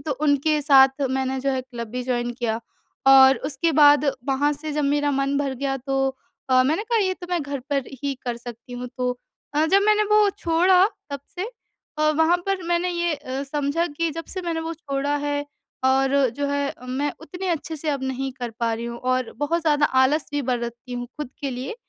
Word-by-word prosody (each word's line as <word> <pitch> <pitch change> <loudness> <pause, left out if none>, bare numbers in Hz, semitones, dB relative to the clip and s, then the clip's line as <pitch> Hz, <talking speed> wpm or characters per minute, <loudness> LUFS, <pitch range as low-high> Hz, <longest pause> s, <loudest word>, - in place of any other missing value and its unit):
तो 310 - -3
उनके 295 +2 +1
साथ 270 -1 +5
मैंने 265 0 -1
जो 275 +1 0
है 260 -1 0
क्लब 235 -3 -7
भी 250 +2 -3
जॉइन 240 -1 -1
किया 230 -2 -2
और 235 - -9 0.5
और 265 0 +8
उसके 305 +3 0
बाद 290 -1 +6 0.2
वहाँ 280 +2 +2
से 300 +1 -5
जब 295 0 0
मेरा 290 +1 +1
मन 275 0 0
भर 275 -2 -1
गया 270 +1 -2
तो 270 +1 0 0.4
अ, 255 0 +6
मैंने 315 +9 +1
कहा 460 +1 0
ये 380 -3 +1
तो 355 - -10
मैं 345 -4 0
घर 280 -1 -4
पर 280 -1 +1 0.2
ही 280 -1 -1
कर 240 -1 -2
सकती 240 +1 -10
हूँ 245 0 -5
अ, - - -5
तो 250 -1 -1 0.5
जब 395 +1 +5
मैंने 425 0 +4
वो 425 -1 +5
छोड़ा 360 +3 +4 0.3
तब 280 -1 -4 0.2
से 365 - -2 0.5
अ, 305 0 +3
वहाँ 320 +3 +3
पर 390 -2 -1
मैंने 345 +1 +1
ये 345 -2 0
अ, 275 -2 -5
समझा 290 +4 -1
कि 330 +2 -2
जब 330 +2 -6
से 370 -2 -5
मैंने 335 -2 -2
वो 325 +1 -4
छोड़ा 285 -2 -2
है 290 0 -2 0.4
और 265 +1 +3 0.2
जो 285 - -1
है 285 0 0
अ, 250 - -12
मैं 275 +3 -1
उतने 360 +4 -6
अच्छे 325 -1 -2
से 310 +1 -4
अब 280 -2 -2
नहीं 265 0 -2
कर 245 -2 -5
पा 230 -1 +1
रही 230 - -5
हूँ, 235 0 -5
और 255 0 -1
बहुत 295 +4 0
ज़्यादा 295 -2 +3 0.2
आलस 290 +3 +2
भी 290 -1 0
बरतती 240 0 -3
हूँ 245 0 -4
खुद 295 -4 -5
के 280 - -2
लिए। 255 - -5
280 Hz, 220 wpm, -23 LUFS, 260-315 Hz, 0.5 s, और